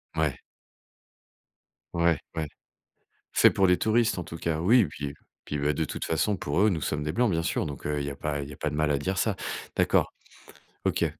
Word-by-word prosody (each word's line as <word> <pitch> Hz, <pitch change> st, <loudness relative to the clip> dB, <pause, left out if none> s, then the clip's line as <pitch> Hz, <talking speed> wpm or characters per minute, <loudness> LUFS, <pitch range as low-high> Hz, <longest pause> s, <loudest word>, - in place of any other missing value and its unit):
Ouais. -, -, 0 dB, 1.5 s
Ouais, 85 Hz, -3 st, +3 dB, 0.2 s
ouais. 80 Hz, -2 st, -1 dB, 0.9 s
Fait -, -, +6 dB
pour 95 Hz, -1 st, +3 dB
les 90 Hz, 0 st, +5 dB
touristes 110 Hz, 0 st, +2 dB
en 85 Hz, -, -3 dB
tout 80 Hz, -, -7 dB
cas, 80 Hz, -2 st, -1 dB
oui, 110 Hz, +4 st, +5 dB
puis, 70 Hz, -1 st, -5 dB
heu. 70 Hz, -, -8 dB, 0.3 s
Puis, 75 Hz, -, -3 dB
bah 75 Hz, +1 st, +2 dB
de 80 Hz, -, 0 dB
toute -, -, -4 dB
façon 95 Hz, +6 st, +1 dB
pour 80 Hz, +1 st, -1 dB
eux, 105 Hz, +1 st, +5 dB
nous 80 Hz, -4 st, -1 dB
sommes 75 Hz, +1 st, -2 dB
des 75 Hz, +1 st, -2 dB
blancs 120 Hz, +1 st, +2 dB
bien 85 Hz, -1 st, +1 dB
sûr, -, -, -1 dB
donc, 70 Hz, -3 st, -7 dB
heu, 75 Hz, -1 st, -1 dB
il 70 Hz, -, -2 dB
y -, -, -3 dB
a 70 Hz, -, -7 dB
pas 75 Hz, -1 st, -2 dB
il 70 Hz, -, -6 dB
y -, -, -9 dB
a -, -, -15 dB
pas 75 Hz, -, -2 dB
de -, -, -5 dB
mal 75 Hz, -1 st, +2 dB
à 70 Hz, -, +3 dB
dire 95 Hz, +6 st, -2 dB
ça. 105 Hz, -2 st, +1 dB, 0.4 s
D'accord. -, -, +3 dB, 0.7 s
OK. -, -, +2 dB
80 Hz, 230 wpm, -27 LUFS, 75-95 Hz, 1.5 s, Fait